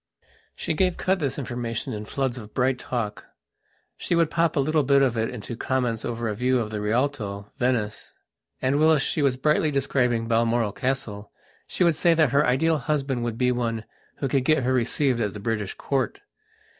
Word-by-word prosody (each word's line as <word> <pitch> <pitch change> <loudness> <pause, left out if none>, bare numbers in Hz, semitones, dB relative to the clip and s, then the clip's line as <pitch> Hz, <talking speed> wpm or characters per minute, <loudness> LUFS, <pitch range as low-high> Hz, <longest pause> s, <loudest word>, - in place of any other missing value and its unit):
She - - -2
gave 180 +3 +1
out 190 0 +3
this 140 -5 -2
information 120 -2 -3
in 105 0 -5
floods 130 +1 -2
of 105 -2 -12
bright 130 0 +1
talkshe 115 -5 -3 0.9
would 170 -2 +3
pop 170 -1 +1
a - - +2
little 155 +3 +2
bit 140 0 +4
of 125 -3 +1
it 110 0 0
into 120 -1 -6
comments 120 -2 -1
over 120 -1 -3
a 105 - -1
view 125 +4 +1
of 110 -3 -2
the 105 -1 -3
Rialto, 105 -3 -1
Venice, 120 -4 -1 0.5
and, 135 +3 +2
whilst 155 -2 +4
she 155 - -1
was 135 -3 +2
brightly 150 +3 +2
describing 125 -4 +1
Balmoral 115 -1 +2
Castle, 115 -5 -3 0.4
she - - 0
would 170 -1 +4
say 170 +2 +3
that 155 -5 +3
her 140 +2 +4
ideal 155 +5 +2
husband 135 -3 -1
would 115 -1 -3
be 125 0 +2
one 115 -2 -2 0.3
who 140 - -2
could 135 0 +1
get 155 -1 +3
her 130 +1 +1
received 125 +1 +1
at 105 -3 -1
the - - -6
British 105 -2 -2
Court. 135 -2 -2
125 Hz, 190 wpm, -25 LUFS, 115-140 Hz, 0.9 s, bit